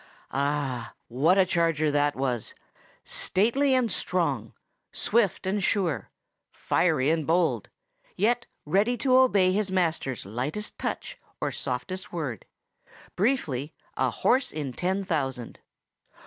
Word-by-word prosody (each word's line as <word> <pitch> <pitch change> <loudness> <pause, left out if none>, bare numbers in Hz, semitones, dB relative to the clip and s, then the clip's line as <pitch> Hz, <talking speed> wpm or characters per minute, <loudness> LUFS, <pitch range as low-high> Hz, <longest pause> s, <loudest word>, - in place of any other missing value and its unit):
Ah! 135 -4 -1 0.2
what 145 +10 +3
a 190 - +6
charger 165 -4 +1
that 145 0 +2
was!—stately 200 - -1
and 250 -3 +2
strong, - - -1 0.4
swift 210 -5 +1
and 195 +1 0
sure, 170 - 0 0.4
fiery 155 -5 +1
and 160 -3 0
bold, 160 - +1 0.5
yet 230 +4 +1 0.2
ready 205 +10 +2
to 255 +1 +3
obey 205 -8 +5
his 200 +1 0
master's 160 - -1
lightest 130 - -4
touch - - -4 0.2
or - - -1
softest 180 +10 -4
word; 145 - -4 0.7
briefly, 160 - 0 0.2
a - - +1
horse 260 0 +1
in 145 -4 -4
ten 190 +7 -1
thousand. 135 - -2
165 Hz, 115 wpm, -27 LUFS, 135-200 Hz, 0.7 s, a